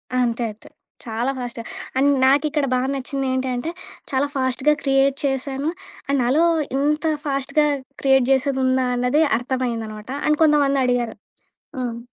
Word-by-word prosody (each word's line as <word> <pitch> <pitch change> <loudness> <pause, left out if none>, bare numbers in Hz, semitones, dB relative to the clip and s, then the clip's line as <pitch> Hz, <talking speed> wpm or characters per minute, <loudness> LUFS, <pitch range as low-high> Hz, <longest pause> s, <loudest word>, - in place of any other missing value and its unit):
ఆ! - - +2
అంతే. 235 0 -1
అంతే. 210 - -17 0.4
చాలా 235 +3 -1
ఫాస్ట్‌గా. 240 -2 -5 0.3
అండ్ 275 +2 +4
నాకిక్కడ 285 +2 +3
బా 255 - +2
నచ్చింది 275 0 -3
ఏంటంటే, 260 +2 -2 0.4
చాలా 270 +1 +1
ఫాస్ట్‌గా 260 +2 +2
క్రియేట్ 270 0 +3
చేసాను. 270 +2 -1 0.4
అండ్ 280 0 +1
నాలో 270 +7 +3 0.3
ఇంత 300 +3 +1 0.2
ఫాస్ట్‌గా 280 +2 +1 0.3
క్రియేట్ 265 -2 +4
జేసేదుందా 260 -1 +2
అన్నది 250 +5 +2 0.2
అర్థమైందనమాట. 235 -4 -4 0.2
అండ్ 300 0 +2
కొంతమంది 290 -3 +3
అడిగారు 245 -2 0 0.6
హ్మ్. 240 -2 -3
265 Hz, 130 wpm, -22 LUFS, 245-280 Hz, 0.6 s, అండ్